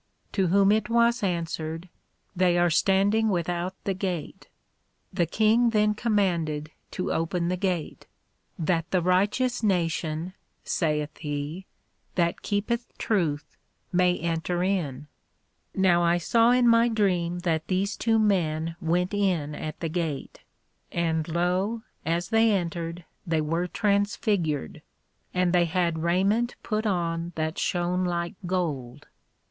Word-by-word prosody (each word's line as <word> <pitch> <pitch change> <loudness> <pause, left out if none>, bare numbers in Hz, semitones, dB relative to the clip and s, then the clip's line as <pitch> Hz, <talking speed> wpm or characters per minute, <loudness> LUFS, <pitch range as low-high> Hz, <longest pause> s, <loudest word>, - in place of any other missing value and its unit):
To 190 -3 +1
whom 195 +3 +4
it 215 +1 +1
was 235 +1 +3
answered, 165 -2 -3 0.5
They 180 -1 +3
are 175 -1 +3
standing 200 +6 +3
without 175 0 -1
the 195 - 0
Gate. 185 -5 -4 0.6
The 175 -3 +1
King 220 +6 +3
then 210 -1 +2
commanded 170 -9 0 0.2
to 185 - -2
open 170 +1 -1
the 180 - 0
Gate, 180 -4 -3 0.5
That 165 0 0
the 185 -2 +1
righteous 205 +8 +1
nation, 170 -3 -1 0.3
saith 150 -2 -1
he, 150 +5 -4 0.5
that 170 -1 +1
keepeth 225 +4 -2
Truth 165 -9 -1 0.4
may 180 0 +3
enter 170 +1 -1
in. 155 -8 -1 0.7
Now 180 -2 +4
I 170 0 +3
saw 230 +7 +3
in 250 0 +4
my 230 0 +5
Dream 180 -6 +1
that 160 -3 -1
these 195 +2 0
two 225 -1 +2
men 165 -6 +1
went 180 +3 0
in 180 -8 0
at 155 +1 -6
the 165 - -1
Gate: 160 -4 -3 0.5
and 160 -2 0
lo, 180 +7 0 0.2
as 170 +2 0
they 225 0 +4
entered, 170 -2 -2 0.2
they 165 -1 +1
were 165 +4 -1
transfigured, 200 - 0 0.5
and 180 -1 +1
they 175 -1 +4
had 170 -1 0
Raiment 195 +8 +1
put 215 0 -1
on 170 -2 -1
that 160 +1 -2
shone 180 +1 0
like 175 +1 -2
Gold. 145 -8 -3
180 Hz, 130 wpm, -26 LUFS, 165-200 Hz, 0.7 s, my